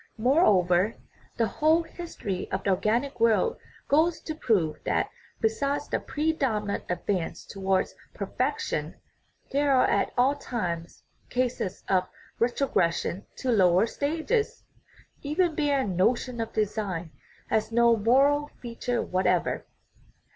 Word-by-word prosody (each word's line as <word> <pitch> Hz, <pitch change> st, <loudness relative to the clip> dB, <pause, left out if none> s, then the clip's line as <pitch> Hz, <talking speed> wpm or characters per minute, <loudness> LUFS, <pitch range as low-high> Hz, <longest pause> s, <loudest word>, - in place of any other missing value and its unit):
Moreover, 210 Hz, -, +3 dB, 0.4 s
the 230 Hz, -, +3 dB
whole 310 Hz, +10 st, +2 dB
history 325 Hz, -, -5 dB
of 190 Hz, -, -2 dB
the 200 Hz, -, +2 dB
organic 235 Hz, +8 st, 0 dB
world 230 Hz, -, +3 dB, 0.3 s
goes 320 Hz, +4 st, +3 dB
to 315 Hz, -, -5 dB
prove 210 Hz, -, +1 dB
that, -, -, 0 dB, 0.3 s
besides 275 Hz, +6 st, 0 dB
the -, -, 0 dB
predominant 270 Hz, -10 st, -1 dB
advance 180 Hz, -1 st, -2 dB
towards 190 Hz, -1 st, -1 dB, 0.2 s
per -, -, -3 dB
fection, -, -, -2 dB, 0.6 s
there 285 Hz, +1 st, +2 dB
are 260 Hz, -2 st, +5 dB
at 200 Hz, -, +1 dB
all 255 Hz, +3 st, +4 dB
times 175 Hz, -12 st, -4 dB, 0.3 s
cases 245 Hz, -7 st, -2 dB
of 185 Hz, -1 st, +1 dB, 0.3 s
retrogression 205 Hz, -7 st, 0 dB
to 260 Hz, -, -1 dB
lower 185 Hz, -2 st, +5 dB
stages. 325 Hz, -, -1 dB, 0.6 s
Even 320 Hz, +4 st, +1 dB
Baer's 285 Hz, -4 st, +1 dB
notion 230 Hz, +6 st, +1 dB
of 225 Hz, -, -4 dB
"design" 195 Hz, -6 st, -2 dB, 0.4 s
has 220 Hz, +1 st, +1 dB
no 235 Hz, 0 st, +5 dB
moral 275 Hz, +7 st, +3 dB
feature 240 Hz, 0 st, -2 dB
whatever. 180 Hz, -1 st, 0 dB
230 Hz, 120 wpm, -27 LUFS, 195-285 Hz, 0.6 s, are